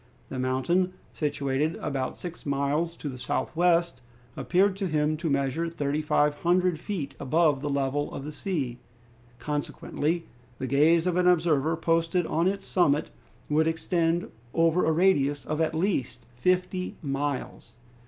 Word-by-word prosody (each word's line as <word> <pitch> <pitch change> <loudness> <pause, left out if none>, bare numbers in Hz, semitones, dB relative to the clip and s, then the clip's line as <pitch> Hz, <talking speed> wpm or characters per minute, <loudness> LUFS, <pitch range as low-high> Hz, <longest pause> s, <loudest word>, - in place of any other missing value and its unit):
The 130 - -4
mountain, 150 +9 +1 0.2
situated 145 +1 -1
about 135 -2 -3
six 175 -1 -7
miles 145 +4 0
to 150 - -7
the 130 -3 -6
northwest, 170 -3 +1 0.3
appeared 190 +2 +2
to 195 -1 -1
him 155 -1 +1
to 165 0 -2
measure 140 +4 0
3,500 155 +3 +1
feet 175 -6 -4
above 150 +1 +2
the 145 - -2
level 140 +1 -1
of 135 - -6
the 150 - -5
sea. 145 -7 -3 0.6
Consequently 150 +4 -2 0.3
the - - -3
gaze 155 +5 +4
of 180 -1 +1
an 180 0 +3
observer 160 -3 +3
posted 165 +1 +1
on 165 +3 +1
its 195 0 -1
summit 150 -5 +2 0.4
would 155 +2 +2
extend 165 +1 0 0.2
over 165 +1 +3
a 160 - +3
radius 145 -5 +2
of 155 +1 -2
at 160 0 0
least 165 - -1
fifty 180 +7 0
miles. 140 -1 -3
160 Hz, 140 wpm, -27 LUFS, 140-175 Hz, 0.6 s, gaze